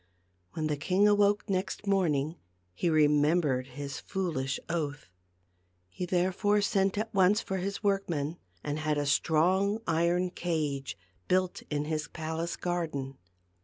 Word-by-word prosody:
When 155 - -2
the 150 -1 0
king 190 +7 +3
awoke 205 0 +3
next 195 +1 -2
morning 165 -6 +1 0.4
he 170 - 0
remem 150 +1 +4
bered 130 -3 0
his 140 +2 -6
foolish 160 -9 -2
oath. 145 - -3 0.8
He 180 - -5
therefore 190 +4 +2
sent 195 -1 +1
at 220 +2 -2
once 195 +2 +4
for 190 - -3
his 195 +3 -3
workmen, 170 -6 0 0.2
and 145 +1 -2
had 155 -1 0
a 145 - 0
strong 180 +8 +2
iron 170 +2 +1
cage 150 -7 -2 0.3
built 185 0 +1
in 150 0 -1
his 155 -1 -2
palace 160 +1 -4
garden. 155 -7 -3
170 Hz, 135 wpm, -30 LUFS, 150-190 Hz, 0.8 s, remem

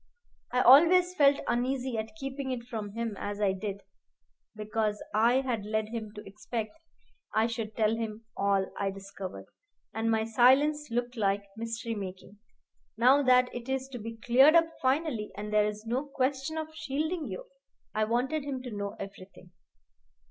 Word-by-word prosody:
I 250 +1 +2
always 345 +8 +7
felt 285 -4 +4
uneasy 255 +1 -1
at 220 +6 -4
keeping 270 -2 -5
it 250 -2 -3
from 215 -4 -6
him 230 -2 -3
as 205 0 -4
I 200 -2 +2
did, 200 0 -5 0.7
because 215 0 -2
I 235 +5 +4
had 240 -6 -2
led 215 +1 -2
him 220 -2 -5
to 210 - -9
expect 215 +2 -5 0.6
I 220 +1 +4
should 225 -2 -4
tell 220 0 +2
him 225 -1 -5
all 195 -1 +1
I 200 - 0
discovered, 195 -1 -8 0.5
and 225 +1 -1
my 220 -1 +2
silence 265 +6 +4
looked 240 +1 -2
like 200 -1 +1
mystery 230 +1 -4
making. 195 0 -8 0.6
Now 255 +5 +5
that 250 -2 +4
it 240 +1 -7
is 265 0 -1
to 250 -2 -7
be 225 +1 -7
cleared 260 +7 +5
up 330 -1 +5
finally, 260 -5 0
and 210 +1 -5
there 210 0 +4
is 210 +1 -6
no 250 +5 -1
question 275 +3 -1
of 315 0 -5
shielding 310 +2 -2
you, - - -6 0.5
I 215 0 +1
wanted 255 +7 0
him 270 -3 -4
to 250 - -6
know 200 0 -4
everything. 195 -2 -10
230 Hz, 165 wpm, -29 LUFS, 210-265 Hz, 0.7 s, always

